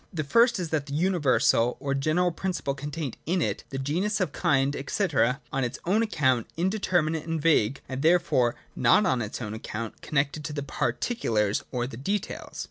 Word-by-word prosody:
The 160 -5 -2
first 235 - +4
is 175 -3 -3
that 150 -2 -1
the 140 - -4
Universal 150 -8 +2
or 140 -1 -2
general 155 +6 +1
principle 170 -5 -2
contained 145 -1 -5
in 180 +3 +1
it, - - -1
the 135 - -5
genus, 175 +11 -1
or 185 - +3
kind, 140 -2 +1
&c., 210 - 0
is, 135 -8 +2 0.2
on 135 -1 0
its 120 - -3
own 200 +6 +3
account, 130 - +1
indeter 185 -1 +1
minate 155 0 -2
and 165 -1 -1
vague, 140 -6 +2
and 130 0 -4
therefore 160 -7 +3 0.2
not 125 - +4
on 130 -9 +1
its 110 +2 -4
own 105 -1 -5
account 110 0 -6
connected 150 +1 -1
with 150 - -6
the 145 - -2
Particulars 120 - 0
or 120 -1 -1
the 120 -2 -7
details. 195 - -4
150 Hz, 190 wpm, -27 LUFS, 130-175 Hz, 0.2 s, first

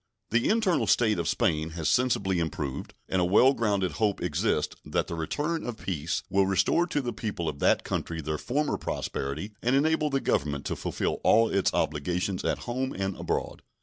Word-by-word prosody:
The 120 +2 +2
internal 215 -6 +2
state 110 -6 +3
of 85 - -1
Spain 80 0 +1
has 80 - -1
sensibly 115 -7 +2
improved, 75 -4 -4
and 95 - +1
a - - +3
well 105 +9 +5
grounded 100 -6 0
hope 105 -3 +2
exists - - 0
that - - -1
the - - -6
return 150 - -2
of 120 -2 -5
peace 85 -4 -3
will 100 -1 +2
restore 95 - +2
to 145 - -1
the 120 -2 -3
people 105 -6 -4
of 70 -2 -3
that - - +3
country 80 -1 -3
their 75 0 -3
former 145 +4 -1
prosperity 70 +9 -3
and 125 +3 +2
enable 155 +1 +2
the 135 -1 +1
Government 70 - -1
to - - -2
fulfill - - -2
all 115 +1 +5
its 100 - +2
obligations 90 +5 -1
at - - -1
home 130 +2 -2
and 95 -1 -2
abroad. - - -3
100 Hz, 185 wpm, -28 LUFS, 85-125 Hz, -, well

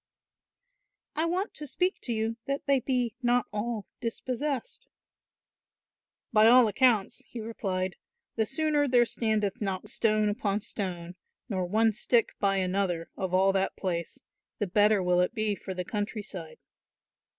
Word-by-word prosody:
"I 315 - +1
want 365 +5 -1
to 300 - -5
speak 360 +7 0
to 245 - -4
you 225 0 -1
that 275 +1 -2
they 275 -1 +3
be 250 -3 0
not 245 -1 +2
all 210 0 -2
dispossessed." 260 - -3 1.5
"By 215 0 +6
all 245 0 +7
accounts," 220 -1 +2
he 240 - -8
replied, 190 -5 -3 0.4
"the 220 -1 +1
sooner 295 +1 +1
there 245 -2 +5
standeth 215 -4 -1
not 195 -2 -3
stone 215 -2 +2
upon 205 0 -1
stone, 180 -4 -5 0.3
nor 185 -4 -1
one 220 +3 +3
stick 235 +2 +2
by 195 -1 +2
another 185 -3 -1
of 190 -2 -3
all 190 +1 +4
that 195 0 0
place, 170 -3 -4 0.3
the 205 - 0
better 205 +1 +3
will 180 0 +3
it 180 +6 0
be 215 -2 0
for 190 -1 -6
the 180 0 -3
country 210 +1 -3
side." 175 -6 -8
215 Hz, 150 wpm, -28 LUFS, 190-240 Hz, 1.5 s, all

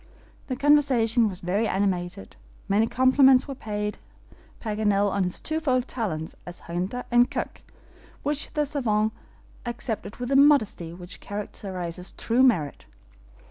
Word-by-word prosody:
The 260 - -2
conversation 255 -5 +3
was 185 -2 -7
very 200 +6 0
animated. 190 -1 -2 0.3
Many 205 +3 +3
compliments 260 +1 +5
were 275 - -4
paid 210 -4 -4 0.6
Paganel 205 -2 +1
on 195 -1 +1
his 180 - -2
twofold 275 -5 0
talents 165 -10 -3
as 175 0 -10
hunter 185 +8 -3
and 240 +1 +5
cook, - - -4 0.6
which 290 +1 -1
the 300 -1 +2
SAVANT 220 -7 0 0.5
accepted 230 -4 -4
with 245 0 -5
the 275 - +2
modesty 275 - +4
which 175 +1 -9
characterizes 185 -3 -6
true 240 +2 +1
merit. 175 - +2
220 Hz, 130 wpm, -25 LUFS, 190-260 Hz, 0.6 s, compliments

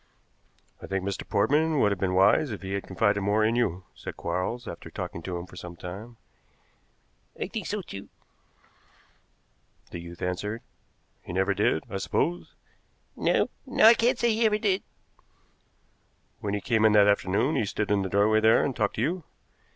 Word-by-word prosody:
"I - - -8
think 95 -1 -2
Mr. 100 -1 -4
Portman 145 +9 +2
would 105 - +3
have 100 - -2
been 90 -1 0
wise 95 +10 +4
if 105 -3 -6
he 95 +1 -4
had 100 - -3
confided 105 -2 +1
more 105 +2 +2
in 115 +2 +2
you," 95 -7 0
said - - -8
Quarles, 90 +8 -3
after 85 - -8
talking 85 - -6
to 90 +1 -4
him 85 - -6
for 90 - -15
some 90 -1 -8
time. 100 +8 -9 1.2
"I - - -1
think 210 -4 -5
so, 210 -2 -3
too," 100 - -9 1.8
the - - -6
youth 85 0 -9
answered. 105 +6 -3 0.6
"He - - -8
never 95 +2 +2
did, 95 -5 +1
I 100 - -4
suppose?" 175 - -1 0.6
"No - - +1 0.2
no, 255 - +3
I 225 - +10
cannot 240 +2 +2
say 235 -2 +2
he 225 +1 +3
ever 210 -1 +2
did." 200 -3 +1 1.6
"When 100 -1 -2
he 100 - -3
came 110 -2 +1
in 110 -1 +5
that 105 -1 +6
afternoon 100 +7 +2
he 110 - +1
stood 105 +1 -2
in 100 -1 +3
the 95 - -3
doorway 105 +3 +3
there 110 +1 +4
and 135 - -2
talked 105 -3 0
to 110 - -1
you?" 170 +5 -1
105 Hz, 180 wpm, -27 LUFS, 95-130 Hz, 1.8 s, I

